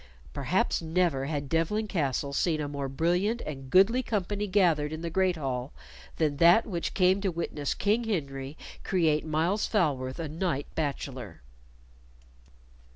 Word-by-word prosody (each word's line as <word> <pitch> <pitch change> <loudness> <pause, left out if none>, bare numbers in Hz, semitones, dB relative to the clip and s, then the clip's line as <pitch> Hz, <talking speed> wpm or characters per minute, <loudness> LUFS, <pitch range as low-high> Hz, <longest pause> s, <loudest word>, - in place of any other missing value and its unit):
Perhaps - - 0
never 165 -4 +1
had 145 -2 -3
Devlen 165 +9 0
Castle 140 -6 -1
seen 155 +2 +1
a 150 - -2
more 140 -1 -4
brilliant 175 - +1
and 135 -3 -7
goodly 195 - +5
company 205 -2 -2
gathered 170 -7 +2
in 155 +1 -5
the 170 - -3
great 185 +1 +2
hall 130 -2 -3 0.4
than 150 -3 +1
that 170 +8 +6
which 175 -6 -3
came 185 +1 +3
to 195 - +1
witness 160 -4 -3
King 215 +4 +1
Henry 140 -8 -3 0.3
create 160 -5 +2
Myles 160 +7 0
Falworth 135 - 0
a 165 - -3
knight 155 -2 -2
bachelor. 130 - -4
160 Hz, 145 wpm, -28 LUFS, 140-185 Hz, 0.4 s, that